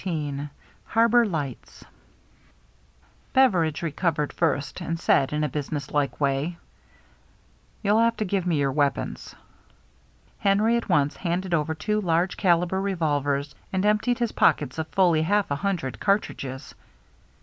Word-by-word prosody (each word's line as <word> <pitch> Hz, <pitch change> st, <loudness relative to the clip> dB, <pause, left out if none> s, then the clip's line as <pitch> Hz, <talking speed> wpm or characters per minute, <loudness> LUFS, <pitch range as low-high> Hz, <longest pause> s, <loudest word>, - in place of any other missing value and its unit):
CHAPTER 185 Hz, -4 st, -2 dB
XIV 145 Hz, -1 st, -4 dB, 0.4 s
HARBOR 230 Hz, +1 st, +4 dB
LIGHTS 150 Hz, -8 st, -5 dB, 1.5 s
BEVERIDGE 180 Hz, -, +3 dB
recovered 155 Hz, -2 st, -1 dB
first, 155 Hz, 0 st, -1 dB
and 165 Hz, -1 st, -3 dB
said 135 Hz, -5 st, +2 dB
in 150 Hz, +1 st, -1 dB
a -, -, +1 dB
businesslike 145 Hz, -2 st, -3 dB
way, 140 Hz, +4 st, 0 dB, 1.3 s
"You'll 210 Hz, +2 st, +3 dB
have 230 Hz, 0 st, +2 dB
to 215 Hz, -, -1 dB
give 185 Hz, -1 st, -1 dB
me 170 Hz, -3 st, +1 dB
your 140 Hz, -1 st, +1 dB
weapons." 145 Hz, 0 st, -2 dB, 1.0 s
Henry 210 Hz, +4 st, +3 dB
at 235 Hz, -, -2 dB
once 145 Hz, 0 st, +2 dB
handed 180 Hz, +1 st, -2 dB
over 160 Hz, 0 st, 0 dB
two 210 Hz, +7 st, -1 dB
large 175 Hz, 0 st, +1 dB
caliber 180 Hz, 0 st, +2 dB
revolvers, 145 Hz, -7 st, -1 dB, 0.2 s
and 190 Hz, +1 st, 0 dB
emptied 215 Hz, +4 st, +2 dB
his 235 Hz, -2 st, -1 dB
pockets 145 Hz, +1 st, +2 dB
of 160 Hz, -, -2 dB
fully 175 Hz, -4 st, +3 dB
half 200 Hz, +2 st, +1 dB
a -, -, +2 dB
hundred 180 Hz, -8 st, -2 dB
cartridges. 140 Hz, -10 st, -2 dB
165 Hz, 135 wpm, -25 LUFS, 145-195 Hz, 1.5 s, HARBOR